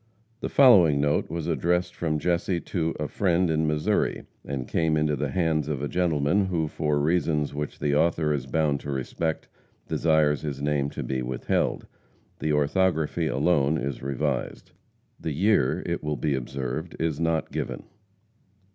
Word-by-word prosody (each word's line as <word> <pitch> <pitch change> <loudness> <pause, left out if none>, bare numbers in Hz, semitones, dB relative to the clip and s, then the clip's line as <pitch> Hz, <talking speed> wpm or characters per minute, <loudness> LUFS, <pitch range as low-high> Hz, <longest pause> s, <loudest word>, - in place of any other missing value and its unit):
The - - -3
following 95 - +6
note 75 +1 +1
was 85 -1 -4
addressed 90 +1 0
from 80 -2 -1
Jesse 85 +2 0
to 80 -1 -2
"a 75 - -1
friend" 90 -2 +1
in 80 0 +1
Missouri, 75 0 0 0.2
and 65 -3 -4
came 80 -2 +1
into 75 -1 +1
the 65 - -2
hands 80 -5 0
of 70 -2 -3
a - - 0
gentleman 90 +3 +1
who, 85 -4 0
for 75 -1 -1
reasons 75 -1 +1
which 75 +1 -4
the 70 - 0
author 80 -1 +2
is 65 -3 -3
bound 75 0 +1
to 70 - -8
respect, 75 +4 -3 0.4
desires 80 -3 +2
his 70 -3 -4
name 70 -1 0
to - - -5
be 65 -1 -2
withheld. 65 0 -1 0.5
The 80 - -1
orthography 80 +2 +1
alone 75 +1 +2
is 70 -3 -4
revised. 70 -1 -3 0.5
The 80 - -3
year, 90 -5 +2
it - - -3
will 75 -1 -2
be 75 -2 0
observed, 65 +5 -4
is 80 -3 -1
not 80 -1 0
given. - - -4
75 Hz, 160 wpm, -26 LUFS, 70-85 Hz, 0.5 s, following